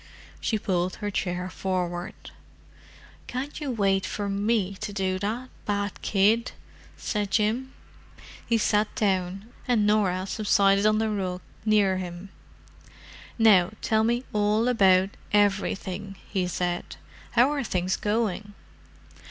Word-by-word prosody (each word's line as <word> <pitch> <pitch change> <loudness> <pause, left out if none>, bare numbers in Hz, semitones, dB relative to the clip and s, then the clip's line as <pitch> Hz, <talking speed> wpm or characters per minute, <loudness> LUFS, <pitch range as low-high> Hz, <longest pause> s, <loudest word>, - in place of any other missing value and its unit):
She 220 - 0
pulled 185 -3 -1
her 205 0 -4
chair 180 -1 -2
forward. 180 +1 -4 1.0
"Can't 275 +5 -5
you 290 - -3
wait 195 -5 +1
for 205 -1 -3
me 200 0 0
to 215 +1 -5
do 190 -2 -1
that—bad 205 -2 -3
kid!" 215 +4 +2 0.4
said 205 -2 -2
Jim. 225 +6 0 0.7
He 230 - +1
sat 210 -1 +1
down, 195 +1 -1
and 230 -4 +3
Norah 195 -3 +2
subsided 200 0 +3
on 215 0 +3
the 220 0 0
rug 185 -3 -2 0.2
near 205 -3 +3
him. 180 +1 -6 1.1
"Now 210 -4 +5
tell 220 -1 +2
me 240 +2 +1
all 210 +2 +2
about 195 -5 +4 0.2
everything," 195 -1 0
he 185 -2 -1
said. 175 0 -2 0.4
"How 250 +4 +5
are 290 -2 -1
things 185 -4 0
going?" 210 -1 -1
205 Hz, 120 wpm, -26 LUFS, 185-220 Hz, 1.1 s, Now